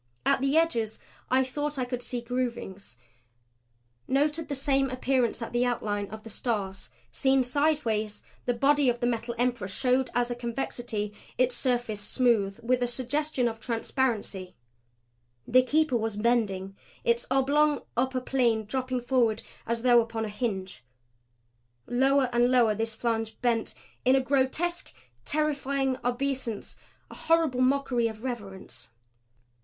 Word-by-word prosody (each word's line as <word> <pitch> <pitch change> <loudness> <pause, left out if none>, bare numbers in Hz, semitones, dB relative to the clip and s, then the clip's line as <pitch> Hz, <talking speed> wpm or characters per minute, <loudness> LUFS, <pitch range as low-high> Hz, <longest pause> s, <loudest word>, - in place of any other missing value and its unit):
At - - +3
the 275 +3 +2
edges 235 -10 +1 0.3
I 260 +1 +4
thought 290 +3 -3
I 255 - 0
could 245 0 -4
see 245 0 -4
groovings; 235 - -4 1.1
noted 295 +3 +1
the 285 - -1
same 270 0 +1
appearances 255 -2 0
at 230 - -7
the 240 +1 +2
outlines 205 -4 -1
of 220 +1 -9
the 225 - -9
Stars. 200 -4 -3 0.2
Seen 265 -1 +3
sidewise, 245 -6 0 0.2
the 245 - +2
body 280 +2 +4
of 240 0 0
the 240 - 0
Metal 235 0 -1
Emperor 245 -5 0
showed 255 +5 +1
as 245 0 +1
a - - -1
convexity; 235 -3 -3 0.2
its 255 0 +3
surface 240 -4 0
smooth, 210 -3 +1
with 250 +1 +1
a 245 - +2
suggestion 255 +2 0
of 225 -1 -4
transparency. 225 -6 -2 0.9
The 255 +2 +6
Keeper 290 0 +2
was 220 -2 -2
bending; 205 -4 0 0.3
its 235 0 +1
oblong 285 +3 +3
upper 255 +1 0
plane 240 -4 +1
dropping 255 +2 -2
forward 240 -3 +1 0.2
as 230 0 -1
though 240 -2 +6
upon 225 -1 -3
a - - -4
hinge. 200 - -4 1.0
Lower 270 +2 +3
and 240 +1 +4
lower 240 -4 +4
this 225 +1 -2
flange 225 -1 -2
bent 235 -2 +1 0.3
in 255 +1 +5
a - - +5
grotesque, 280 +6 0 0.3
terrifying 280 -3 0
obeisance; 245 -2 -2 0.4
a - - -9
horrible 325 -6 +2
mockery 255 -3 +2
of 220 0 -8
reverence. 205 - -6
245 Hz, 140 wpm, -28 LUFS, 225-265 Hz, 1.1 s, The